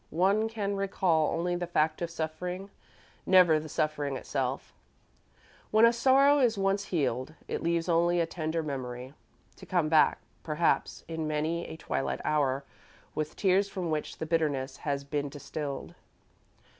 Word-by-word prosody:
One 200 +5 +3
can 205 -3 -2
recall 185 -5 +1
only 175 +2 -1
the 175 0 -3
fact 155 +1 +1
of 170 - -1
suffering, 180 +4 -4 0.6
never 180 -4 +6
the 155 0 -8
suffering 145 -3 -1
itself. 135 0 -3 1.0
When 220 +1 +6
a 230 - +5
sorrow 275 +4 +5
is 235 -5 +3
once 195 +1 +1
healed, 140 -4 -1
it - - -3
leaves 170 0 0
only 175 +1 +3
a 170 - +3
tender 165 -1 -3
memory, 130 -2 -5 0.4
to - - -12
come 175 -4 +1
back, 155 -1 +5 0.2
perhaps, 160 +2 0
in 160 -1 -3
many 155 +3 -1
a 160 - -8
twilight 70 - -2
hour, 140 -3 +1 0.5
with 155 0 -3
tears 195 +1 +2
from 180 -4 -3
which 155 -1 -3
the - - -4
bitterness 150 -5 0
has 140 -1 -2
been 145 0 -2
distilled. 140 0 -6
160 Hz, 150 wpm, -29 LUFS, 145-185 Hz, 1.0 s, never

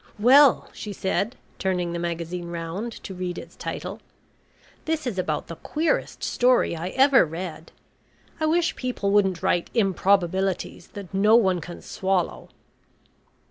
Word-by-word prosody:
"Well," 265 +5 +6
she 210 - -6
said, 200 +5 -1 0.2
turning 180 -2 -1
the 170 - -3
magazine 170 +1 -4
round 170 +7 -4
to 195 - -6
read 180 -1 -4
its - - -9
title. - - -5 0.9
"This 315 -2 -1
is 220 -7 -2
about 155 -4 -1
the 165 - -8
queerest 315 +2 -1
story 250 -7 +2
I 165 +2 -4
ever 265 +5 +5
read. 165 0 -6 0.7
I 315 - +1
wish 340 +2 +2
people 245 -6 -2
wouldn't 190 -3 +2
write 175 -2 +1
improbabilities 190 -3 +1
that 200 -2 -9
no 210 +3 +5
one 190 -6 +3
can 175 +2 -9
swallow." 190 -2 -2
190 Hz, 140 wpm, -25 LUFS, 175-230 Hz, 0.9 s, Well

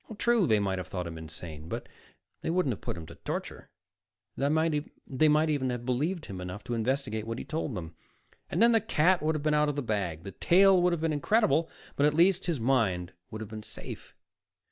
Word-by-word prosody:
True, 235 -6 +3
they 110 - +4
might 95 -2 -1
have 90 - -6
thought 90 -2 -4
him 85 -1 -6
insane, 80 0 -9
but - - -4 0.5
they - - -3
wouldn't 170 -7 +1
have - - -10
put - - -4
him 80 - -7
to - - -11
torture. - - -6 0.7
They 140 - 0
might 160 +2 +2 0.8
even 130 -3 0
have 120 -1 -4
believed 155 +8 -1
him 95 -2 -7
enough 90 +3 -6
to 120 - -4
investigate 115 -2 -1
what 115 +1 -3
he - - -6
told 155 -4 -3
them, 85 -3 -6 0.6
and 180 +8 +2
then 235 - +7
the 225 -1 +4
cat 185 -3 +3
would 155 +1 +1
have 150 - -3
been 155 0 +2
out 150 0 +3
of 145 - -2
the 145 - -2
bag. 95 -8 -2
The 100 - -7
tale 185 - +5
would 180 0 +3
have 170 -2 -1
been 160 -1 +1
incredible, 160 - +2 0.3
but 145 - +4
at 150 - +1
least 180 +3 +4
his 165 -6 0
mind 110 -8 +1 0.2
would 110 - -7
have 110 - -6
been 110 -1 -6
safe. - - -10
135 Hz, 220 wpm, -29 LUFS, 100-165 Hz, 0.8 s, then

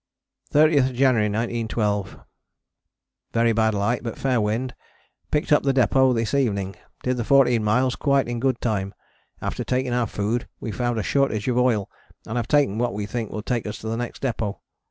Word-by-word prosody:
30th 145 -4 +4
January 120 -5 +3
1912. 110 -3 -2 1.1
Very 115 0 +3
bad 110 0 +2
light 105 +4 0
but 115 -2 -5
fair 130 -4 +1
wind, 115 +5 -1 0.6
picked 150 0 -1
up 150 - +6
the 135 -1 +1
depôt 130 0 +4
this 115 +1 -1
evening. 100 -8 0 0.3
Did 125 0 0
the 120 - -1
14 125 -3 +4
miles 125 +3 +2
quite 140 +2 +1
in 120 -1 -3
good 130 -1 0
time, 100 -4 -2 0.5
after - - -3
taking 130 -1 -1
our 120 -2 +1
food 105 +4 -2
we 115 - -4
found 120 +2 -1
a 110 - -1
shortage 135 -6 0
of 125 -1 +2
oil 115 -6 +2 0.4
and 110 - -5
have 115 -2 -1
taken 140 -7 +2
what 120 -4 0
we 105 0 -3
think 115 +1 -4
will 105 - -5
take 120 -2 -2
us 105 +1 -5
to 110 - -6
the 115 - -1
next 120 +2 -5
depôt. 110 -6 -2
120 Hz, 185 wpm, -23 LUFS, 110-130 Hz, 1.1 s, up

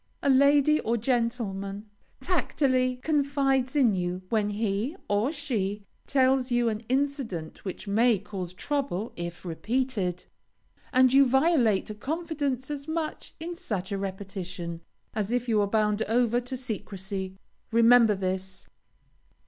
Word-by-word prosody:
A 280 - +4
lady 285 +3 +5
or 235 +1 0
gentleman 220 -4 -2 0.3
tacitly 260 -8 +1
confides 275 -3 +1
in 255 -7 +4
you 180 0 -2
when 215 -2 +1
he 210 - -1
(or 205 +7 +1
she) 210 -10 -2 0.2
tells 265 -1 +3
you 240 -1 +3
an 215 -1 -2
incident 260 - -2
which 190 +1 -6
may 225 +3 +4
cause 190 -3 -6
trouble 265 -6 -2
if 175 +1 -6
repeated, 200 0 -1 0.7
and 255 0 +5
you 275 0 +7
violate 260 - +3
a - - -4
confidence 285 0 -3
as 285 0 -5
much 315 -1 -4
in 340 +2 -5
such 195 - -3
a 200 - -1
repetition, 185 -3 -5 0.3
as 210 -2 -2
if 245 0 0
you 220 -2 +3
were 205 - +2
bound 210 0 +1
over 240 +1 +2
to 250 +1 -4
secrecy. 195 -5 -4 0.3
Remember 230 -1 +6
this. 190 0 -3
230 Hz, 135 wpm, -27 LUFS, 195-270 Hz, 0.7 s, you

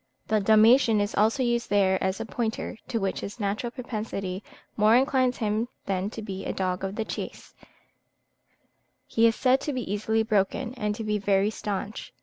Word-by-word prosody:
The 215 0 +3
Dalmatian 220 +2 +5
is 205 0 -1
also 220 +6 +2
used 235 -1 0
there 195 -2 +2
as 190 +2 -1
a 225 - -3
pointer, 225 -1 -3
to 230 - -1
which 195 -2 -1
his 205 +5 -7
natural 210 +3 -1
propensity 215 -6 -5 0.3
more 215 +2 +5
inclines 255 -1 +2
him 215 +1 0 0.2
than 195 0 -1
to 220 0 -7
be 195 -2 -5
a - - -2
dog 185 -1 -2
of 195 +1 -3
the 220 - -2
chase: - - -7 1.5
he 230 0 +3
is 225 - +2
said 260 +3 +3
to 295 - -3
be 255 - -2
easily 220 +2 +1
broken, 220 +3 0
and 210 -4 -2
to 225 - -5
be 210 -1 0
very 200 +1 +2
staunch. 205 0 -5
215 Hz, 180 wpm, -26 LUFS, 200-230 Hz, 1.5 s, Dalmatian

